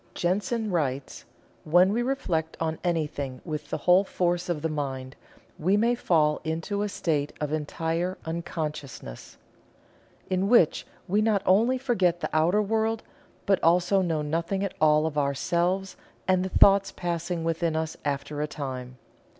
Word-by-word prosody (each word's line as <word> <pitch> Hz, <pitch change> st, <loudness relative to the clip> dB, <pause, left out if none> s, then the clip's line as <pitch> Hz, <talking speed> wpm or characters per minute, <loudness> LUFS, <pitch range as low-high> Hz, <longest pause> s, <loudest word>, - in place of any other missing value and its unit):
Jensen 205 Hz, +5 st, -1 dB
writes: 140 Hz, -6 st, -2 dB, 0.4 s
"When 180 Hz, +5 st, +4 dB
we 235 Hz, -, +1 dB
reflect 180 Hz, -, -2 dB
on 160 Hz, -1 st, -2 dB
anything 150 Hz, -6 st, -2 dB
with 150 Hz, -3 st, -5 dB
the -, -, -2 dB
whole 180 Hz, +2 st, +4 dB
force 175 Hz, -2 st, -1 dB
of 160 Hz, -3 st, -2 dB
the -, -, +2 dB
mind, 135 Hz, -3 st, -4 dB, 0.4 s
we 185 Hz, +6 st, +2 dB
may 235 Hz, +3 st, +3 dB
fall 155 Hz, -10 st, +2 dB
into 165 Hz, +6 st, -2 dB
a 210 Hz, -, -1 dB
state 150 Hz, -7 st, -1 dB
of 150 Hz, 0 st, -2 dB
entire 165 Hz, +4 st, -2 dB
unconsciousness, 155 Hz, -, -6 dB, 0.9 s
in 185 Hz, +1 st, 0 dB
which 225 Hz, -10 st, +4 dB, 0.2 s
we 205 Hz, +4 st, +2 dB
not 215 Hz, -2 st, +2 dB
only 230 Hz, +7 st, +4 dB
forget 190 Hz, -10 st, +1 dB
the -, -, -3 dB
outer 175 Hz, +7 st, +3 dB
world, 220 Hz, +1 st, 0 dB, 0.4 s
but 195 Hz, -2 st, +2 dB
also 180 Hz, +3 st, +4 dB
know 165 Hz, -4 st, -1 dB
nothing 170 Hz, +6 st, -1 dB
at 200 Hz, -, -2 dB
all 155 Hz, 0 st, +4 dB
of 150 Hz, -2 st, -1 dB
ourselves 175 Hz, +7 st, 0 dB, 0.3 s
and 185 Hz, -1 st, +3 dB
the 190 Hz, -, -3 dB
thoughts 195 Hz, 0 st, +5 dB
passing 170 Hz, -1 st, -3 dB
within 165 Hz, 0 st, 0 dB
us 160 Hz, 0 st, -2 dB
after 145 Hz, +1 st, -3 dB
a 150 Hz, -, -1 dB
time. 130 Hz, -4 st, -6 dB
170 Hz, 150 wpm, -26 LUFS, 150-195 Hz, 0.9 s, thoughts